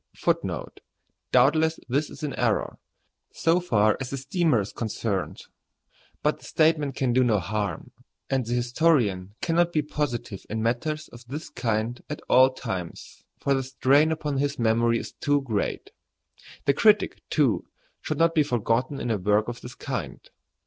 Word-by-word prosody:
[A] - - -23
[Footnote - - -2
A: - - -40 0.5
Doubtless 155 +6 +4
this 140 +5 0
is - - -11
an 145 -3 -2
error, - - 0 0.5
so 165 +2 +2
far 110 -11 +2
as 130 - -4
the 135 - -3
steamer 145 - +1
is 100 0 -4
concerned; 110 -3 -3 0.8
but - - +1
the - - -20
statement 155 -3 +2
can 125 -3 0
do 130 +1 +4
no 115 -4 +3
harm, 105 +2 -3 0.4
and 135 -1 0
the 120 +1 -2
historian 120 - +1
cannot 170 +1 +2
be 155 -3 +1
positive 130 -9 -3
in 110 +1 -2
matters 150 +7 -1
of 120 0 -13
this 150 +5 -6
kind 115 +1 -2
at 150 - -6
all 130 +1 +6
times, 95 -9 -6
for 140 - +1
the 135 - +1
strain 135 +4 +3
upon 150 -3 -2
his 145 +1 -1
memory 115 0 +2
is - - -6
too 145 0 0
great. 110 -6 -2 0.7
The 140 - +4
critic, 210 +7 +3
too, - - +1 0.3
should - - -3
not 165 0 +3
be 160 - +4
forgotten 125 0 0
in 120 - -2
a 110 - 0
work 105 +3 +2
of 120 0 -6
this 125 +1 -9
kind. - - -5
130 Hz, 170 wpm, -26 LUFS, 115-150 Hz, 0.8 s, all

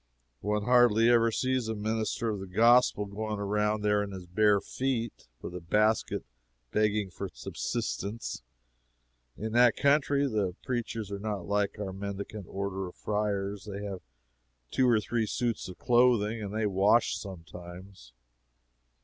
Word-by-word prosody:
One 105 +1 -1
hardly 120 -1 +5
ever 115 -1 +5
sees 130 +1 0
a 110 - -2
minister 110 +2 -1
of 105 - -4
the 95 - -7
gospel 115 +2 +4
going 105 +1 -4
around 105 +1 0
there 105 0 +3
in 100 -1 -4
his 95 -2 -8
bare 105 +3 +3
feet, 120 -1 -3 0.2
with - - -6
a 90 - -5
basket, 105 +6 +1 0.5
begging 105 -2 +1
for - - -5
subsistence. 100 - -4 1.0
In 110 +1 -4
that 120 0 +5
country 140 0 +3
the 100 -7 -1
preachers 115 -4 -3
are 100 - -4
not 105 -3 -3
like 100 +1 0
our 100 -2 -4
mendicant 100 0 -6
orders 95 -1 -3
of 90 - -11
friars 105 -1 -2
they 100 +1 -5
have 100 -3 -5 0.7
two 130 -1 +3
or 115 -2 +5
three 110 +1 -1
suits 115 -2 -2
of 90 - -9
clothing, 120 -3 +3
and 100 -2 -5
they 110 +1 -1
wash 100 +4 +3
sometimes. 90 - -10
105 Hz, 150 wpm, -29 LUFS, 100-115 Hz, 1.0 s, hardly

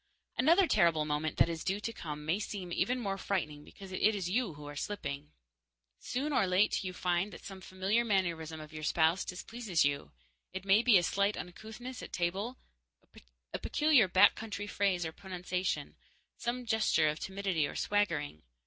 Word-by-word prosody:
Another 335 +10 +5
terrible 170 - +3
moment 150 +1 -2
that - - +5
is 165 -1 -4
due 195 +2 0
to 230 +2 -4
come 150 -6 -6
may 170 +6 +1
seem 195 -4 -5
even 250 +7 +1
more 195 -4 -2
frightening 150 -8 -2
because 195 +4 -12
it 185 - -4
is 180 -3 -2
you 220 -6 0
who 145 0 -10
are 145 0 -7
slipping. 145 -5 -4 0.7
Soon 285 +4 -2
or 195 - +3
late 185 +3 +2
you 185 - -3
find 180 +2 0
that - - -11
some 195 -1 -8
familiar 190 +5 0
mannerism 170 -7 -1
of 155 0 -10
your 155 - -6
spouse 160 +3 +2
displeases 185 -2 -1
you. 140 0 -1 0.4
It 190 +1 -5
may 200 +3 +5
be 240 -4 +6
a 175 - +2
slight 200 +4 +1
uncouthness 220 +8 -8
at - - -9
table, 195 +8 -2 1.0
a - - -2
peculiar 295 -9 +4
back 185 +1 +6
country 210 -2 -5
phrase 195 -4 0
or 160 - -3
pronunciation, 180 +1 -3 0.4
some 245 +1 -3
gesture 220 -8 +3
of 150 +1 -1
timidity 190 -6 -1
or - - -8
swaggering. 165 - 0
190 Hz, 175 wpm, -32 LUFS, 165-210 Hz, 1.0 s, be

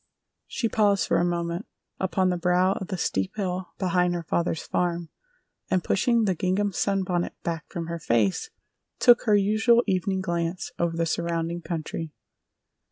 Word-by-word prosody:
She 235 - -1
paused 205 -4 +2
for 170 - +2
a - - +2
moment 170 +2 -2 0.3
upon 185 0 +1
the - - 0
brow 180 +2 +3
of 190 - -5
the 185 - -3
steep 95 - -1
hill 185 -2 -2
behind 180 -1 +1
her 170 - -3
father's 165 0 -1
farm, 175 -2 -1 0.6
and 185 -2 +1
pushing 235 +3 +2
the 195 -3 +2
gingham 190 +4 0
sunbonnet 185 -2 -1
back 165 -2 -4
from 170 -1 -4
her 170 0 -4
face, 115 - +1 0.5
took 240 +1 +5
her 215 -3 +4
usual 220 +4 +4
evening 190 -1 0
glance 170 -1 -2
over 170 -1 0
the 165 - +1
surrounding 170 0 -2
country. 165 -1 -5
180 Hz, 160 wpm, -26 LUFS, 170-195 Hz, 0.6 s, took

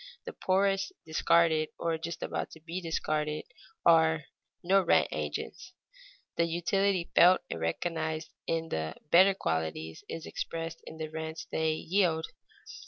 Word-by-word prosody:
The - - -6
poorest, 195 +1 +1
discarded 160 0 +3
or 165 -1 0
just 170 +1 -5
about - - -3
to 160 - -12
be 170 +3 -5
discarded, 155 -2 -1 0.4
are 160 -2 +5 0.4
no 195 +3 +4
rent 175 - +3
agents. - - -5 0.6
The 170 - +3
utility 175 +2 0
felt 180 +2 +7
and 85 - -3
recognized 160 - -2 0.2
in 165 0 -1
the 80 0 -3 0.2
better 190 +3 +7
qualities 80 - -3
is 165 - -5
expressed 165 0 -5
in 160 - -9
the 155 -1 -4
rents 160 0 -5
they 160 0 +1
yield. 165 -1 +1
165 Hz, 135 wpm, -30 LUFS, 155-175 Hz, 0.6 s, felt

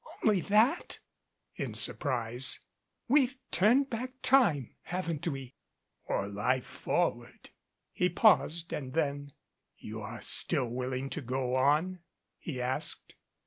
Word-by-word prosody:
"Only 205 -4 +4
that?" 215 - +2 0.6
in - - -4
surprise. 125 -2 +1 0.5
"We've 265 -1 +3 0.2
turned 245 +9 +4
time 230 - -2
back 255 +1 -3
ward, 175 - +4
haven't 170 -3 -3
we 135 -4 -4 0.3
?" - - -51
"Or 100 - 0
lif 105 +6 +1
e - - -15
forward," - - -1 0.4
he 180 - +1
paused 170 -4 +3
and 130 -3 -5
then: 145 -2 -1 0.4
"You - - -7
are - - -7
still - - +1
willing 130 +2 -3
to 155 - -3
go 125 0 -2
on?" 150 +8 +2 0.4
he 135 -6 -5
asked. 125 +1 -1
150 Hz, 130 wpm, -31 LUFS, 130-205 Hz, 0.6 s, Only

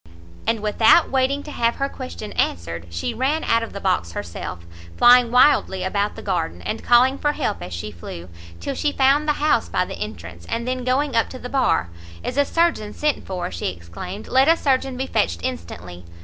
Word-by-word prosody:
And 225 -1 +1
without 220 +9 +4
waiting 270 +2 +1
to 300 - -8
have 235 -3 +1
her 275 - -1
question 85 - -8
answered, 85 0 -2
she 85 0 -3
ran 285 +6 0
out 230 0 +2
of 230 - -5
the 200 - -6
box 180 - 0
herself, 85 0 -6 0.3
flying 245 0 +7
wildly 250 -6 +4
about 200 +2 -1
the - - -9
garden, 175 -4 -2
and 220 - -4
calling 255 +3 +4
for 295 0 +1
help 85 - -2
as 90 +1 -7
she 90 +5 -5
flew, 85 -1 -9 0.3
till 85 - -3
she 295 - 0
found 280 +2 +3
the 300 - +3
house 295 -5 +1
by 180 - +1
the - - -8
entrance; 85 -4 -7
and 235 +1 -2
then, 255 0 -2
going 260 +1 0
up 230 - +2
to 255 - -8
the 250 - -8
bar, 260 - +1 0.3
"Is 250 - -3
a 285 0 +3
surgeon 330 -12 0
sent 300 -1 -1
for?" 185 - -4
she 85 - -3
exclaimed, 90 - -7
"let 265 +2 +4
a 330 +1 +5
surgeon 265 -3 0
be 265 - -2
fetched 85 - 0
instantly!" 85 +1 -6
225 Hz, 205 wpm, -22 LUFS, -, 0.3 s, flying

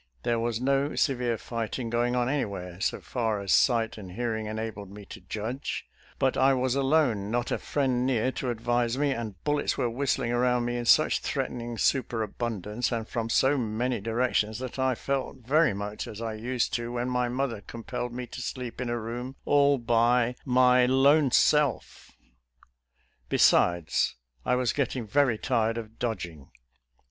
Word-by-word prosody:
There 115 -1 +1
was 115 -1 -1
no 140 +3 +1
severe 125 -4 +1
fighting 115 +1 -4
going 120 +1 +1
on 120 -1 +1
anywhere, 100 -10 -3
so - - -1
far 115 -4 -1
as 100 -2 0
sight 115 -3 +3
and 95 -3 -9
hearing 110 0 -2
enabled 110 -2 -5
me 100 +1 -11
to - - -11
judge, 110 +8 -4 0.3
but 130 - +1
I 135 0 +4
was 130 -1 0
alone, 135 -7 +2
not 120 +1 -1
a - - 0
friend 130 -4 0
near 130 -1 +1
to 130 - -3
advise 120 +1 0
me, 145 0 +1
and 115 -6 -4
bullets 145 0 0
were 120 - 0
whistling 130 -1 0
around 125 0 +2
me 120 0 -2
in 120 - -3
such - - +5
threatening 120 -1 -3
super 120 -2 +1
abundance 110 +1 -3
and 115 -2 -2
from 115 -2 -3
so 135 +4 +3
many 120 0 -1
directions, 115 -1 0
that 130 +1 -6
I 130 -1 +2
felt 135 +2 -2
very 145 -3 +3
much 105 +1 -5
as 105 - -8
I 115 -1 -3
used 120 +2 -2
to 120 0 -5
when 120 0 -2
my 125 -1 0
mother 125 -4 -2
com 115 +2 -9
pelled 125 0 -4
me 125 +1 -5
to 125 - -8
sleep 125 0 -5
in 125 - -2
a 120 - -1
room 120 +3 -5
all 140 -1 +4
by 120 +1 +2
" - - -31 0.2
my 125 0 +5
lone 140 +3 +4
self." 150 +2 +1 1.2
Besides, 85 -2 +3 0.3
I 125 - +3
was 125 -1 +1
getting 130 -4 -1
yery 130 -2 +2
tired 115 -2 0
of 110 -1 -8
dodg 110 -7 -2
ing. 80 -5 -14
120 Hz, 175 wpm, -27 LUFS, 110-130 Hz, 1.2 s, such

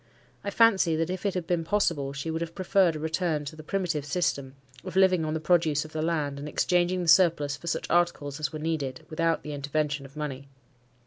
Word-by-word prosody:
I 200 - -2
fancy 200 -6 +4
that 165 +2 -1
if 185 +2 -2
it 195 - -2
had 180 -2 -2
been 175 -1 0
possible, 165 -7 0
she 140 +3 -4
would 160 +1 -3
have 170 0 -5
preferred 185 -2 +2
a - - -4
return 160 -1 -1
to 145 - -7
the 155 - -10
primitive 165 -2 -2
system, 140 -4 -1 0.3
of 185 -1 -7
living 185 -3 +4
on 155 0 -2
the - - -1
produce 155 -3 +2
of 155 - -11
the 155 - -3
land, 150 -4 -1
and 145 +1 -6
exchanging 180 +2 +1
the - - -4
surplus 160 -4 +4
for 170 - -12
such 165 - -2
articles 165 -5 0
as 150 -3 -2
were 155 - -5
needed, 150 -4 -3
without 165 +1 0
the 150 - -6
intervention 145 0 -2
of 135 +3 -18
money. 140 -2 -5
160 Hz, 220 wpm, -27 LUFS, 145-175 Hz, 0.3 s, fancy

